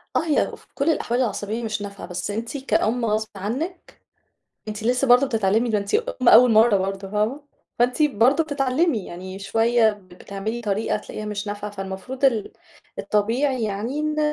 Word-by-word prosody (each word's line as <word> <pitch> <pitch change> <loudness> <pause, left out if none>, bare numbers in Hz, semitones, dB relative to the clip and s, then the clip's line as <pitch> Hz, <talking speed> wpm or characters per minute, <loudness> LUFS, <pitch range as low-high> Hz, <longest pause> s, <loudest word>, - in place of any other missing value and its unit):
آه، - - +5
هي 305 - +1
في - - -22
كل 285 +3 +1
الأحوال 250 -5 0
العصبية 215 +1 -2
مش 215 -2 -3
نافعة، 200 -1 -7
بس 180 +3 -4
أنتِ 230 +6 -4
كأم 245 -3 0
غصب 215 0 0
عنِّك 260 - -5 0.7
أنتِ 215 0 -5
لسه 250 +3 +1
برضه 250 +3 +6
بتتعلمي 225 0 +1
ده 215 - +2
أنتِ 200 0 -4
أم 455 - +1
أول 245 0 +8
مرّة 220 -1 +5
برضه 195 +1 -4
فاهمة؟ 215 +8 -1 0.4
فأنتِ 250 +5 +2
برضه 270 +4 +3
بتتعلمي 280 - 0
يعني 185 +2 -8
شوية 225 +3 +3
بتعملي 200 +3 -7
طريقة 210 0 -1
تلاقيها 215 0 -8
مش 210 0 -4
نافعة، 205 0 -4
فالمفروض 195 +7 -4
ال 230 -6 +1 0.5
الطبيعي 235 +4 0
يعني 215 +8 -3
إن 305 0 -1
225 Hz, 165 wpm, -23 LUFS, 205-255 Hz, 0.7 s, أول